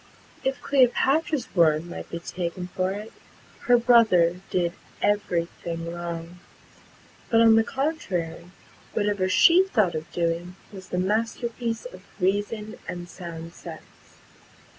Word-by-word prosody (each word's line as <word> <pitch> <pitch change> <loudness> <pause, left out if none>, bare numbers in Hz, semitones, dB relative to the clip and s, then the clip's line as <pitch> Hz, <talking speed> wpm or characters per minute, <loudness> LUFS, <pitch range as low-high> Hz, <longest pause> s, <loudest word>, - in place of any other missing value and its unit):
If 265 0 -1
Cleopatra's 275 +2 +2
word 160 -2 +4
might 175 - -8
be 170 - -4
taken 180 +1 -5
for 185 0 -1
it, 210 +3 -6 0.5
her 245 0 +7
brother 210 -8 +4
did 175 -2 0 0.3
every 200 -5 +1 0.2
thing 170 0 -4
wrong; 170 0 -6 0.9
but, 225 - +4
on 225 -1 +7
the 225 - +5
contrary, 195 - -3 0.4
whatever 205 -3 0
she 340 - +6
thought 215 - +1
of 155 +1 -5
doing 170 +1 -2 0.2
was 190 -2 -10
the 180 - -2
masterpiece 225 +4 -1
of 185 -7 -9 0.2
reason 205 +3 -1
and 175 0 -5
sound 170 -2 -8
sense. - - -13
185 Hz, 125 wpm, -25 LUFS, 170-230 Hz, 0.9 s, her